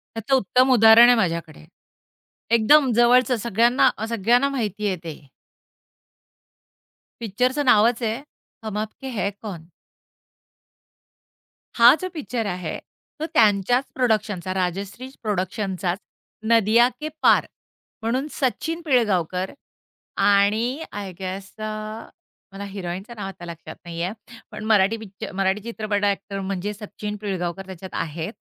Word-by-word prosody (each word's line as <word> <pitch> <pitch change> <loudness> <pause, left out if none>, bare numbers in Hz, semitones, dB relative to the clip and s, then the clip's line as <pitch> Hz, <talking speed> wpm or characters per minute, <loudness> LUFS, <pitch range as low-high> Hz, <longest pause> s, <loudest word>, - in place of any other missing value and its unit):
त्याचं 225 +4 +1
उत्तम 255 +2 +3
उदाहरण 225 0 +8
आहे 245 - +6
माझ्याकडे. 170 - -2 0.9
एकदम 260 +4 +5
जवळचं 250 +2 +4
सगळ्यांना 235 +4 +3
अ, 220 - -3
सगळ्यांना 235 +5 +2
माहितीये 210 -6 -2
ते. 165 -2 -5 2.1
पिक्चरचं 250 +7 0
नावच 235 0 +4
आहे 225 +3 -1 0.4
हम 215 -1 -4
आप 215 0 -2
के 270 - -6
है 200 - 0
कौन? 180 -7 -7 2.1
हा 235 +1 +9
जो 370 - -2
पिक्चर 250 -8 -3
आहे, 180 -4 -4 0.4
तो 315 - -2
त्यांच्याच 220 +4 +3
प्रोडक्शनचा 210 -7 0
राजश्री 190 +6 -3 0.2
प्रोडक्शनचाच 190 -2 -2 0.5
नदिया 230 +1 +5
के 310 - -4
पार - - +5 0.6
म्हणून 250 +6 -1
सचिन 320 +5 -2
पिळगावकर 190 - +1 0.7
आणि 215 +8 +2
आय 200 -2 -6
गेस 190 0 -5
अ, - - -7 0.9
मला 195 +1 -7
हिरोईनचं 195 +2 -6
नाव 205 -2 -5
आता 190 -2 -10
लक्षात 170 -1 -9
नाहीये, 170 +1 -3 0.4
पण 215 - -8
मराठी 215 -1 +3
पिक्चर 215 -1 -9
मराठी 195 +1 0
चित्रपट 215 -2 -2
अ‍ॅक्टर 200 0 -1
म्हणजे 195 +1 -3
सचिन 210 0 -7
पिळगावकर 190 -2 -4
त्याच्यात 190 0 -9
आहेत 160 +5 -5
210 Hz, 120 wpm, -23 LUFS, 190-235 Hz, 2.1 s, हा